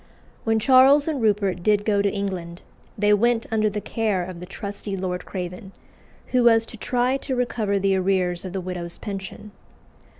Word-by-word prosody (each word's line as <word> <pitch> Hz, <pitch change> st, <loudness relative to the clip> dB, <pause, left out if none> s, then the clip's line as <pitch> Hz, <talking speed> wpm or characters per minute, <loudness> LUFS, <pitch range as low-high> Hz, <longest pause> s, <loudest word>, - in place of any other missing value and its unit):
When 225 Hz, -1 st, +2 dB
Charles 265 Hz, +5 st, +6 dB
and 300 Hz, -5 st, -1 dB
Rupert 205 Hz, -4 st, +1 dB
did 205 Hz, +2 st, +2 dB
go 205 Hz, -2 st, +2 dB
to 200 Hz, -1 st, +1 dB
England, 185 Hz, -4 st, -5 dB, 0.3 s
they 210 Hz, 0 st, +3 dB
went 230 Hz, +2 st, +2 dB
under 215 Hz, -1 st, +2 dB
the 210 Hz, 0 st, -3 dB
care 210 Hz, -5 st, -1 dB
of 180 Hz, -1 st, -8 dB
the 180 Hz, -, -9 dB
trusty 200 Hz, 0 st, -6 dB
Lord 180 Hz, -1 st, -4 dB
Craven, 180 Hz, +1 st, -6 dB, 0.6 s
who 250 Hz, -1 st, +2 dB
was 225 Hz, -1 st, +5 dB
to 225 Hz, -, -10 dB
try 250 Hz, +4 st, 0 dB
to 265 Hz, -1 st, -4 dB
recover 230 Hz, -5 st, 0 dB
the 195 Hz, 0 st, +2 dB
arrears 185 Hz, -2 st, 0 dB
of 185 Hz, -, -6 dB
the 190 Hz, 0 st, -3 dB
widow's 175 Hz, -1 st, -6 dB
pension. 200 Hz, +1 st, -7 dB
200 Hz, 175 wpm, -23 LUFS, 185-225 Hz, 0.6 s, Charles